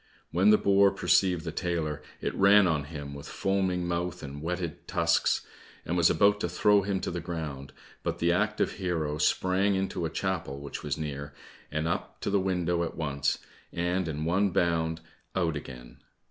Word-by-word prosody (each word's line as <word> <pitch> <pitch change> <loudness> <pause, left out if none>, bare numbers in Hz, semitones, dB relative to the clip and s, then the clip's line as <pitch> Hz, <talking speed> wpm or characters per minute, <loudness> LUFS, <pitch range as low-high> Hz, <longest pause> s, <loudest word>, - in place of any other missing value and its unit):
When 95 +5 +4
the 105 - +7
boar 100 0 +5
perceived 95 -3 +2
the 80 - -3
tailor, 80 -4 -2 0.2
it - - -2
ran 100 +1 +6
on 80 -5 +1
him 75 -2 -7
with 70 0 -9
foaming 95 -2 0
mouth 90 0 -2
and 70 +1 -7
whetted 85 -1 -4
tusks, - - +2 0.4
and 85 - -1
was 85 -2 +5
about 105 0 +4
to 90 - -1
throw 100 +4 +4
him 100 0 -1
to - - -2
the 85 - -3
ground, 75 -5 -5 0.3
but - - -2
the 85 0 +2
active 105 +4 +1
hero 80 -6 -2
sprang 95 +5 +2
into 95 -2 -2
a - - -1
chapel 85 -6 -3
which 70 0 -6
was 75 -1 -2
near, 70 -2 -5 0.4
and 75 +2 -1
up 85 - -3
to - - -1
the 100 - +3
window 90 -2 0
at 85 - -5
once, 70 -4 0 0.3
and 90 +1 -1
in 75 0 -3
one 95 +4 +2
bound 80 -2 0 0.3
out 85 -4 +1
again. 65 -4 -9
85 Hz, 180 wpm, -28 LUFS, 75-95 Hz, 0.4 s, the